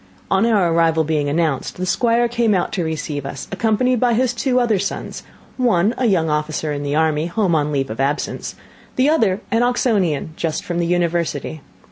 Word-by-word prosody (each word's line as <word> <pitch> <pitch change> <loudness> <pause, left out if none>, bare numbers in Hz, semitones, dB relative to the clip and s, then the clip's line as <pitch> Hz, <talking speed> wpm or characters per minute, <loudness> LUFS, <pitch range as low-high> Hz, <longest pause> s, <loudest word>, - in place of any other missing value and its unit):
On 195 +4 +3
our 195 -7 +2
arrival 165 -1 +3
being 150 -2 0
announced, 155 -3 -1
the 185 - -2
Squire 235 +5 +2
came 230 -3 +1
out 180 - -1
to 180 - -1
receive 155 -3 -3
us, 135 -1 -7
accompanied 225 +5 +1
by 240 -1 +2
his 250 +1 +1
two 255 +1 +1
other 230 -5 +2
sons; 200 - -4 0.4
one 225 -5 +2
a 250 - 0
young 175 -6 +2
officer 150 0 -1
in 145 - -4
the 145 0 -2
army, 155 0 +1
home 185 0 0
on 150 -1 +1
leave 135 -3 -1
of 110 - -7
absence; 140 +3 -2 0.4
the 255 +2 +3
other 220 -10 +2
an 230 0 +2
Oxonian, 210 - +1
just 165 -2 -2
from 175 -1 -3
the 170 - 0
University. 170 -4 -1
175 Hz, 190 wpm, -20 LUFS, 155-230 Hz, 0.4 s, On